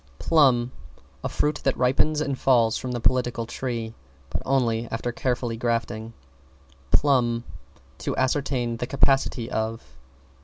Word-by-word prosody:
=PLUM= 130 Hz, -7 st, +3 dB, 0.5 s
A -, -, -1 dB
fruit 150 Hz, 0 st, 0 dB
that 135 Hz, -, +1 dB
ripens 140 Hz, +4 st, +2 dB
and 140 Hz, -3 st, -1 dB
falls 120 Hz, -4 st, +3 dB
from 130 Hz, -, -3 dB
the 120 Hz, -, -2 dB
Political 120 Hz, -1 st, +1 dB
Tree 115 Hz, -2 st, -4 dB, 0.4 s
but -, -, -2 dB
only 120 Hz, -4 st, +1 dB
after 115 Hz, +2 st, -2 dB
careful 120 Hz, -1 st, -1 dB
grafting. 115 Hz, -1 st, -2 dB, 0.8 s
=PLUMB= 120 Hz, -, +3 dB, 0.6 s
To -, -, -3 dB
ascertain 130 Hz, -3 st, 0 dB
the 125 Hz, -, -3 dB
capacity 135 Hz, -3 st, +2 dB
of. 110 Hz, +1 st, -2 dB
120 Hz, 125 wpm, -25 LUFS, 115-135 Hz, 0.8 s, =PLUM=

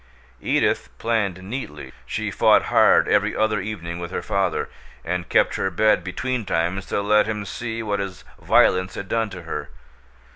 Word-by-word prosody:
Edith -, -, +1 dB
planned 105 Hz, -5 st, -1 dB
neatly. 75 Hz, -, -6 dB
She -, -, -3 dB
fought -, -, +4 dB
hard, -, -, +5 dB
every -, -, +2 dB
other 110 Hz, -1 st, +1 dB
evening, 85 Hz, -5 st, -5 dB
with 85 Hz, 0 st, -5 dB
her -, -, -4 dB
father, 95 Hz, -2 st, 0 dB, 0.4 s
and 90 Hz, +1 st, -3 dB
kept -, -, +3 dB
her 95 Hz, -, 0 dB
bed 105 Hz, +4 st, +2 dB
betweentimes 95 Hz, -3 st, -2 dB
to 100 Hz, -, -1 dB
let 105 Hz, +1 st, +4 dB
him 105 Hz, -2 st, -3 dB
see 115 Hz, +1 st, -4 dB
what 100 Hz, -2 st, -1 dB
his 95 Hz, -2 st, -5 dB, 0.2 s
violence 90 Hz, 0 st, +3 dB
had 100 Hz, -, -6 dB
done 115 Hz, 0 st, 0 dB
to 90 Hz, -3 st, -9 dB
her. 75 Hz, -3 st, -5 dB
100 Hz, 160 wpm, -23 LUFS, 90-110 Hz, 0.4 s, hard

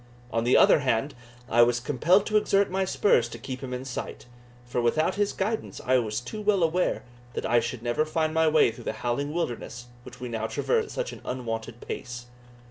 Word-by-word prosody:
On 115 Hz, 0 st, 0 dB
the 125 Hz, -, +5 dB
other -, -, +6 dB
hand, 130 Hz, 0 st, 0 dB, 0.3 s
I 120 Hz, -1 st, +4 dB
was 120 Hz, 0 st, +4 dB
compelled 150 Hz, -, +3 dB
to 215 Hz, -, -2 dB
exert 200 Hz, -2 st, +3 dB
my 190 Hz, +1 st, +1 dB
spurs 125 Hz, -, +2 dB
to 115 Hz, -, -8 dB
keep 130 Hz, +2 st, -7 dB
him 130 Hz, -2 st, -6 dB
in 125 Hz, +1 st, -4 dB
sight, 130 Hz, -, -6 dB, 0.4 s
for 120 Hz, 0 st, -1 dB
without 155 Hz, +9 st, +2 dB
his 205 Hz, 0 st, 0 dB
guidance 215 Hz, +3 st, -3 dB
I 130 Hz, 0 st, +4 dB
was 110 Hz, -2 st, -2 dB
too 210 Hz, -, -6 dB
well 205 Hz, -3 st, +2 dB
aware 170 Hz, +3 st, +1 dB, 0.3 s
that -, -, -3 dB
I 120 Hz, +1 st, +4 dB
should 120 Hz, 0 st, -4 dB
never 120 Hz, +5 st, +1 dB
find 155 Hz, 0 st, -1 dB
my 160 Hz, 0 st, +3 dB
way 155 Hz, -6 st, +4 dB
through 115 Hz, -, -12 dB
the -, -, -2 dB
howling 140 Hz, +5 st, -1 dB
wilderness 120 Hz, -6 st, -4 dB
which 125 Hz, 0 st, -12 dB
we 125 Hz, -, -5 dB
now 110 Hz, -2 st, -3 dB
traversed 455 Hz, -, 0 dB
at -, -, -11 dB
such -, -, -3 dB
an -, -, -11 dB
unwonted 120 Hz, -2 st, -5 dB
pace. 120 Hz, 0 st, -6 dB
130 Hz, 215 wpm, -27 LUFS, 120-170 Hz, 0.4 s, other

